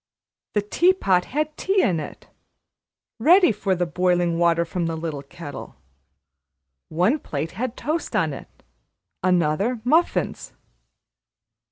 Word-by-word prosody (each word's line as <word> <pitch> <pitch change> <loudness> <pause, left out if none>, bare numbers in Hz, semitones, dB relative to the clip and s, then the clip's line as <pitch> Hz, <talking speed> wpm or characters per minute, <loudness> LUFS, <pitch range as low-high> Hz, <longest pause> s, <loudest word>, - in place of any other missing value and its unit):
The 210 - +1
tea 345 - +3
pot 185 - +1
had 305 +2 -2
tea 385 0 +1
in 170 -4 +1
it, 150 - -9 0.9
ready 350 - +6
for 195 -2 -1
the 180 0 0
boiling 175 0 +1
water 170 0 +3
from 170 0 -2
the 165 - -2
little 160 -3 -4
kettle; 145 +1 -9 1.1
one 185 - +1
plate 155 - -4
had 250 +1 -4
toast 310 -5 -3
on 165 -8 +1
it, - - -12 0.6
another, 180 +6 +1
muffins. 320 +8 0
180 Hz, 125 wpm, -23 LUFS, 165-255 Hz, 1.1 s, ready